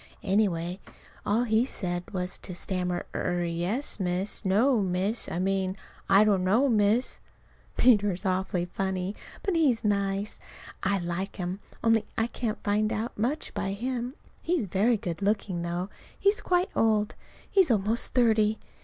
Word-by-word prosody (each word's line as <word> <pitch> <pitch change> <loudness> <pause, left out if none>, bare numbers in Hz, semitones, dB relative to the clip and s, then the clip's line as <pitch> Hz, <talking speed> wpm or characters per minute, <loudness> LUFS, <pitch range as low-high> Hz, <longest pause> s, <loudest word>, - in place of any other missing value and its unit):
Anyway, 185 -3 +1 0.5
all 220 +4 +3
he 220 -1 +3
said 175 -8 -3
was 180 -2 -3
to 180 - -7
stammer: 180 -1 -2
"Er 175 -1 -1
yes, 175 +11 0
Miss 185 +3 0
no, 220 +5 +3
Miss. 190 +4 -1
I - - -3
mean, 190 +1 0 0.3
I 195 +2 +7
don't 200 -3 +2
know, 220 +9 +3
Miss." 220 +1 +2 0.6
Peter 205 -5 +5
is 185 +3 -6
awfully 185 -1 0
funny. 190 +2 -3 0.3
But 390 -3 0
he's 275 -9 +3
nice. 200 0 0 0.4
I 195 +1 +1
like 175 +2 -3
him, 180 +1 -4 0.2
only 225 -1 +4
I 225 - +2
can't 230 -2 -4
find 215 +1 +1
out 225 +1 -3
much 255 +9 -2
by 195 - -2
him. 245 +4 -3 0.3
He's 330 -8 0
very 205 +6 +2
good 175 -2 -5
looking, 200 -3 0
though 175 +2 -3 0.3
he's 405 +2 +2
quite 360 +1 +1
old. 215 -2 +2 0.3
He's 380 -5 +4
almost 220 +2 +1
thirty. 220 -3 +3
205 Hz, 150 wpm, -28 LUFS, 185-230 Hz, 0.6 s, I